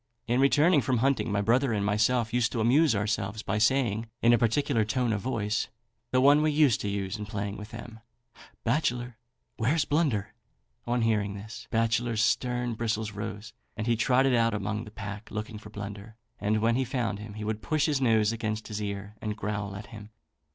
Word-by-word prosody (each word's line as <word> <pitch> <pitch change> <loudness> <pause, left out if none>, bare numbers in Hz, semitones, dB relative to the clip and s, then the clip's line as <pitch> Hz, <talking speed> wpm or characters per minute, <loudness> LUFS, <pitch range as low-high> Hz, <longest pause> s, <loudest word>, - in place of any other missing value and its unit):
In 120 +2 +1
returning 145 +3 +5
from 130 -1 0
hunting, 130 -2 +1
my 100 0 +1
brother 120 +4 +2
and 100 -2 0
myself 110 +3 +1
used 120 -1 +2
to 120 - -1
amuse 125 +4 +4
ourselves 105 0 -2
by 110 - -1
saying, 115 -2 +2 0.2
in 120 +1 +6
a - - +6
peculiar 115 +1 +2
tone 120 +2 0
of 105 - -2
voice, 105 -4 -1 0.4
the 130 - +2
one 145 +3 +6
we 155 - +3
used 145 -6 +3
to 100 - -2
use 100 +1 -3
in 105 - -5
playing 100 -1 -3
with 105 0 -8
them 110 0 -9 0.6
'Bachelor, 120 -2 -1 0.4
where's 140 +6 +1
Blunder?' 140 -10 0 0.5
On 120 0 +1
hearing 105 -3 +1
this, 105 +3 -9
Bachelor's 115 0 +1
stern 125 0 +1
and 115 - -4
bristles 110 -2 -1
rose, 105 +1 -6 0.2
and 110 - -2
he 120 0 +2
trotted 130 +3 +3
about 115 -2 +3
among 105 +2 -3
the - - -9
pack, 100 0 -7
looking 110 0 -5
for 105 - -12
Blunder, 105 +1 -8 0.2
and 105 +1 +1
when 115 +1 +3
he 130 - +2
found 120 -5 -2
him 105 -1 -9
he 110 - -6
would 110 0 -3
push 155 +1 +1
his 145 -4 +1
nose 110 -4 +3
against 110 -1 -3
his 105 0 -4
ear 100 0 -5
and 105 -1 -3
growl 105 -2 -3
at 100 +2 -7
him. 105 -1 -10
110 Hz, 200 wpm, -28 LUFS, 105-125 Hz, 0.6 s, in